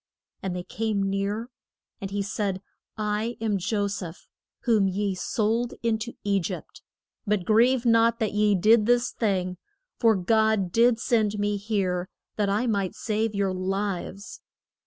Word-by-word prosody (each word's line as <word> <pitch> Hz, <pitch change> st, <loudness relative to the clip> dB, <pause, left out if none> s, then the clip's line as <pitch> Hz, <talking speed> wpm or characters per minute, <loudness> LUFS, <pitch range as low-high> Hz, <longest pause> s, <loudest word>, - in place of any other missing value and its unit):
And 190 Hz, -2 st, -3 dB
they 180 Hz, -, -4 dB
came 210 Hz, +1 st, -1 dB
near. 200 Hz, +5 st, -2 dB, 0.5 s
And 195 Hz, -, -4 dB
he 200 Hz, 0 st, -2 dB
said, 200 Hz, -1 st, -2 dB, 0.3 s
I 215 Hz, +2 st, -1 dB
am 215 Hz, -3 st, 0 dB
Jo 205 Hz, +2 st, 0 dB
seph, 190 Hz, -4 st, -6 dB, 0.3 s
whom 220 Hz, -5 st, +3 dB
ye 195 Hz, +1 st, -1 dB
sold 225 Hz, +5 st, -1 dB
in 225 Hz, -1 st, +1 dB
to 235 Hz, +2 st, -5 dB
E 200 Hz, -1 st, +2 dB
gypt. 170 Hz, -, -6 dB, 0.5 s
But 205 Hz, -3 st, +1 dB
grieve 240 Hz, +3 st, +4 dB
not 230 Hz, 0 st, +4 dB
that 220 Hz, -4 st, -1 dB
ye 210 Hz, -1 st, +3 dB
did 215 Hz, +3 st, +4 dB
this 245 Hz, 0 st, +3 dB
thing, 185 Hz, -4 st, -1 dB, 0.4 s
for 225 Hz, -2 st, +5 dB
God 215 Hz, 0 st, +2 dB
did 235 Hz, +2 st, +4 dB
send 220 Hz, -4 st, +1 dB
me 205 Hz, 0 st, 0 dB
here 195 Hz, -4 st, -1 dB, 0.3 s
that 205 Hz, -2 st, 0 dB
I 210 Hz, +5 st, +1 dB
might 200 Hz, -5 st, -1 dB
save 215 Hz, 0 st, -1 dB
your 195 Hz, -1 st, 0 dB
lives. 195 Hz, +1 st, -3 dB
210 Hz, 155 wpm, -26 LUFS, 195-225 Hz, 0.5 s, for